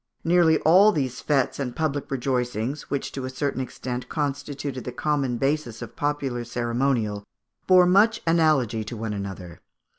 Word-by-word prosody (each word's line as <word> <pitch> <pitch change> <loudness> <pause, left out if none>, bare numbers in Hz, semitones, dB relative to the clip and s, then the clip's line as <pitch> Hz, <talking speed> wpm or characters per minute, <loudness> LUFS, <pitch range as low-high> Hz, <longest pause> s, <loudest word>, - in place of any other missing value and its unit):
Nearly 165 -2 +4
all 190 +7 +6
these 130 - -2
fêtes 140 -3 0
and 125 -3 -3
public 145 -3 -2
rejoicings, 125 0 -2
which 140 -1 -2
to 135 - -5
a - - -4
certain 130 0 -2
extent 125 -1 -5
constituted 145 -2 -3
the 125 - -5
common 135 -2 -1
basis 135 -3 -1
of 115 - -10
popular 140 -4 -2
ceremonial, 120 -3 -1 0.4
bore 185 -1 +7
much 205 +5 +4
analogy 155 -10 +2
to 115 +2 -7
one 110 -1 -3
another. 95 -4 -7
135 Hz, 150 wpm, -25 LUFS, 120-150 Hz, 0.4 s, bore